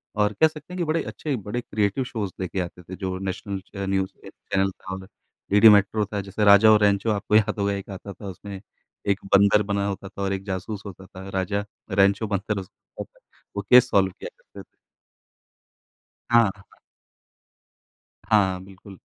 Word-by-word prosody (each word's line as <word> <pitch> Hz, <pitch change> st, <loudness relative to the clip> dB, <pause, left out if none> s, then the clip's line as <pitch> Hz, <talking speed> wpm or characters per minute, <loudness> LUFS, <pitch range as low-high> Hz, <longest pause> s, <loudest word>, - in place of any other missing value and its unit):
और 105 Hz, 0 st, +1 dB
कह 160 Hz, -, +8 dB
सकते 155 Hz, +2 st, -11 dB
हैं -, -, -6 dB
कि 175 Hz, -, 0 dB
बड़े 160 Hz, 0 st, 0 dB
अच्छे, 150 Hz, -3 st, -4 dB
बड़े 105 Hz, +2 st, -4 dB
क्रिएटिव 105 Hz, +2 st, -1 dB
शोज़ 110 Hz, -6 st, -4 dB
लेके 95 Hz, 0 st, -3 dB
आते 90 Hz, 0 st, -5 dB
थे 95 Hz, +2 st, -8 dB
जो 95 Hz, -1 st, -4 dB
नेशनल 95 Hz, +1 st, -4 dB, 0.2 s
अ, -, -, -2 dB
न्यूज़ 95 Hz, 0 st, -1 dB
एक -, -, -11 dB, 0.2 s
चैनल 95 Hz, 0 st, +2 dB
था 95 Hz, 0 st, -8 dB, 0.5 s
डीडी 105 Hz, +2 st, +8 dB
मेट्रो 105 Hz, +1 st, +4 dB
था 105 Hz, -, -1 dB
जैसे 100 Hz, +2 st, -3 dB
राजा 100 Hz, +2 st, +8 dB
और 105 Hz, -, +6 dB
रैंचो 100 Hz, +1 st, +2 dB
आपको 105 Hz, 0 st, 0 dB
याद 105 Hz, -1 st, +3 dB
होगा 100 Hz, 0 st, +1 dB
एक 100 Hz, 0 st, -6 dB
आता 100 Hz, +1 st, -8 dB
था। 100 Hz, -, -10 dB
उसमें 95 Hz, +1 st, -8 dB, 0.5 s
एक 100 Hz, 0 st, +2 dB, 0.2 s
बंदर 100 Hz, +1 st, +5 dB
बना 100 Hz, 0 st, -1 dB
होता 100 Hz, -1 st, -5 dB
था 100 Hz, -, -9 dB
और 100 Hz, 0 st, 0 dB
एक 95 Hz, 0 st, -4 dB
जासूस 100 Hz, +1 st, -5 dB
होता 95 Hz, -1 st, -10 dB
था। 95 Hz, 0 st, -11 dB
राजा 100 Hz, +2 st, -1 dB, 0.3 s
रैंचो 100 Hz, +3 st, +3 dB
बंदर 100 Hz, +1 st, -2 dB
उस 95 Hz, -, -9 dB, 0.9 s
वो 100 Hz, -, -1 dB
केस 125 Hz, 0 st, +7 dB
सॉल्व 95 Hz, -3 st, +3 dB
किया -, -, -6 dB
करते -, -, -13 dB
थे। -, -, -14 dB, 1.7 s
हाँ। 115 Hz, -3 st, +5 dB, 1.8 s
हाँ, 95 Hz, -4 st, +2 dB
बिल्कुल। 95 Hz, 0 st, -14 dB
100 Hz, 180 wpm, -24 LUFS, 95-105 Hz, 1.8 s, कह